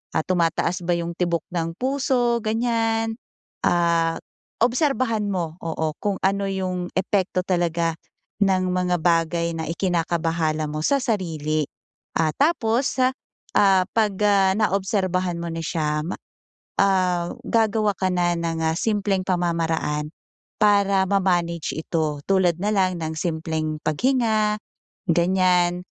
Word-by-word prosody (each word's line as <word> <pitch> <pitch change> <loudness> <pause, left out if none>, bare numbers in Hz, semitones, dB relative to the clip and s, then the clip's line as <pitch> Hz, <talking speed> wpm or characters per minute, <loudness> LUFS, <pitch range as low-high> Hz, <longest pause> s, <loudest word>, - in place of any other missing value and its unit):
ah, - - +2
tumataas 175 0 0
ba 175 - +2
yung 170 0 -3
tibok 170 -2 0
ng 165 -1 -2
puso, 255 -3 +1
ganyan? 225 0 0 0.5
Ah, 170 -1 +2 0.5
obserbahan 250 -4 +1
mo, 175 -5 -3
oo, 160 -1 -1
kung 205 -1 -1
ano 195 +1 +1
yung 185 -2 -2
epekto 185 -1 0
talaga 170 -2 0 0.5
ng 185 -2 +2
mga 180 -1 +1
bagay 170 0 +2
na 160 0 -4
ikinakabahala 165 -3 0
mo 155 - -3
sa 280 - +3
sarili. 160 - -1 0.5
Ah, 160 -1 +2
tapos, 265 -5 +1 0.6
ah 195 -2 +5
'pag, 215 -2 +2
ah 195 -2 +4
naobserbahan 190 -3 0
mo 170 - -4
na 165 - -4
siya 150 -1 -1
ma 180 - -3 0.7
ah, 185 -3 +2
gagawa 220 -3 +2
ka 185 - 0
na 175 -1 +2
ng, 165 -1 -2
ah, 160 0 +1
simpleng 205 -3 0
pamamaraan 165 -4 0 0.5
para 200 -2 +4
ma-manage 175 -4 0
ito 160 -2 -1
tulad 185 -4 +3
na 205 - +1
lang 185 -3 +1
ng 160 0 -3
simpleng 160 -1 -2
paghinga 215 - +1 0.5
ganyan, 180 0 +2
180 Hz, 120 wpm, -23 LUFS, 165-205 Hz, 0.7 s, ah